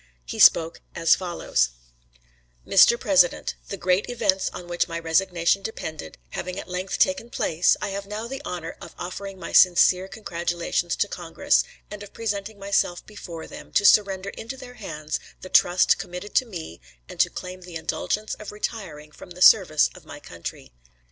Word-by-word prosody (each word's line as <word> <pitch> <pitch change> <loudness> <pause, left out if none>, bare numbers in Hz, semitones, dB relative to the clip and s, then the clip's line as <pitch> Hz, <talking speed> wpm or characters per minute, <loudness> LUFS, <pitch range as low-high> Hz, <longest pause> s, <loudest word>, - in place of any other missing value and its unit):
He - - -6
spoke 165 0 +5
as 165 -1 +4
follows: 175 - 0 1.0
"Mr. 235 +5 +6
President: 300 - +3 0.2
The 200 - -4
great 185 +4 +1
events 205 -6 +1
on 175 - -9
which 175 0 0
my 170 -1 -4
resignation 170 +2 +1
depended 160 - -6
having 185 - -5
at - - -8
length 185 +1 -3
taken 280 -4 +1
place, 170 -6 +2
I 205 - -1
have 195 0 -5
now 215 +3 -5
the 270 +3 -6
honor 170 - -5
of - - -11
offering 195 +2 -6
my - - -7
sincere 185 +1 +5
congratulations 175 -3 -2
to 205 - 0
Congress, 175 -4 0 0.3
and 210 0 -7
of 205 - -11
presenting 210 -1 -4
myself 195 -3 0
before 175 -6 -9
them, - - -11
to 205 - +3
surrender 200 -2 +4
into 235 +4 -8
their 250 -1 -11
hands 155 -9 -5 0.2
the 185 - -9
trust 180 0 +4
committed 185 +2 -7
to 255 - +2
me 165 - -8 0.3
and - - -11
to - - +4
claim 185 0 -8
the 175 -2 -11
indulgence 205 +6 -2
of 215 - -8
retiring 190 -8 -6
from - - -13
the 180 0 -11
service 170 -8 +6
of - - -14
my - - -10
country. - - -9
185 Hz, 170 wpm, -24 LUFS, 170-210 Hz, 1.0 s, Mr